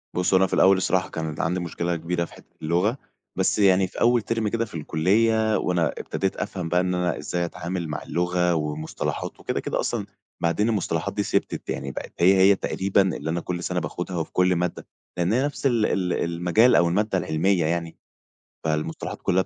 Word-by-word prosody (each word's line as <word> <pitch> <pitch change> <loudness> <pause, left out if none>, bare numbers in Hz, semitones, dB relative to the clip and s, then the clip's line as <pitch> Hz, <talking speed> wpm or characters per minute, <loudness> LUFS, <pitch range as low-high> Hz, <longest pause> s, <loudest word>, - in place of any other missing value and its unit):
بُص 90 +1 +1
هو - - +7
أنا 95 0 +4
في - - -7
الأول 95 0 +5
الصراحة 95 0 0
كانت 80 -2 -4
عندي 90 +3 0
مشكلة 85 0 -2
كبيرة 85 +1 -2
في - - -16
حتة - - -18
اللغة، 90 - +1 0.4
بس - - +1
يعني 95 -1 +4
في - - -9
أول 120 0 +4
term 115 0 -1
كده 115 +2 0
في 105 - -13
الكلية 110 +8 +2
وأنا 85 -3 +1
ابتديت 95 -1 -2
أفهم 90 -4 -4
بقى 90 +1 +3
إن 90 0 -1
أنا 90 0 0
إزاي 85 -1 -2
أتعامل 85 0 -4
مع 75 - -4
اللغة، 90 0 +1
ومصطلحات 75 0 -3
وكده، - - -2
كده - - -2
أصلًا - - -1 0.4
بعدين 85 +7 +1
المصطلحات 105 -5 -1
دي - - 0
ثِبتت، - - -2
يعني 70 - -3
بقت - - -7
هي 90 +3 +6
هي 95 +1 +6
تقريبًا 95 +1 +1 0.2
اللي 75 +3 -5
أنا 85 +1 -1
كل 90 -1 -4
سنة 90 -1 -1
باخدها 90 +3 -4
وفي 80 - -3
كل 90 0 +3
مادة، 90 0 -2 0.3
لأن 90 +4 +1
هي 130 +3 +2
نفس 145 -1 -5
ال 115 -5 +3
ال 90 -2 0
المجال 90 +8 +3
أو 85 0 +5
المادة 100 +2 +1
العلمية 85 +2 +1
يعني، 85 0 -2 0.7
فالمصطلحات 80 0 -3
كلها 95 +1 +2
90 Hz, 195 wpm, -24 LUFS, 85-95 Hz, 0.7 s, هو